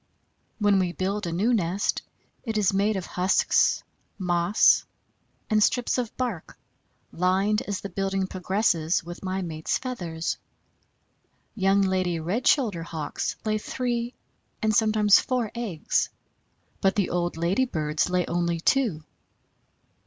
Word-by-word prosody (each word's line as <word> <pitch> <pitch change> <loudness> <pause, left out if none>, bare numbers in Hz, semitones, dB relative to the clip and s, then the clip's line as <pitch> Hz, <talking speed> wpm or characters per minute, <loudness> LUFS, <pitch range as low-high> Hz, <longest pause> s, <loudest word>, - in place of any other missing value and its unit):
When 205 -3 +3
we 180 -2 0
build 195 +1 -2
a - - -2
new 205 +9 +1
nest, 190 -2 0 0.4
it 225 -3 -2
is 200 -2 +2
made 205 +2 +2
of 190 -2 -3
husks, 185 +1 +2 0.3
moss, 175 +1 +3 0.6
and 215 -1 +2
strips 245 +3 +2
of 240 -3 -4
bark, 240 -10 -4 0.5
lined 190 +4 +1
as 200 -2 -3
the 200 - -6
building 195 +1 -1
progresses 185 -3 0
with 175 +1 -9
my 190 0 -2
mate's 160 -2 -2
feathers. 175 -11 -4 1.1
Young 195 -2 +3
lady 185 -3 0
Red 190 +10 -1
shouldered 200 - +2
Hawks 155 -3 -3
lay 215 0 +1
three 240 +1 -3 0.4
and 220 0 +1
sometimes 215 -2 +5
four 250 -5 -1
eggs, 215 -10 -1 0.7
but 195 -1 +3
the 200 -3 0
old 175 -1 -1
lady 180 +10 +1
birds 155 -7 -1
lay 180 -1 +1
only 170 0 -1
two. 205 - +1
195 Hz, 130 wpm, -26 LUFS, 175-215 Hz, 1.1 s, sometimes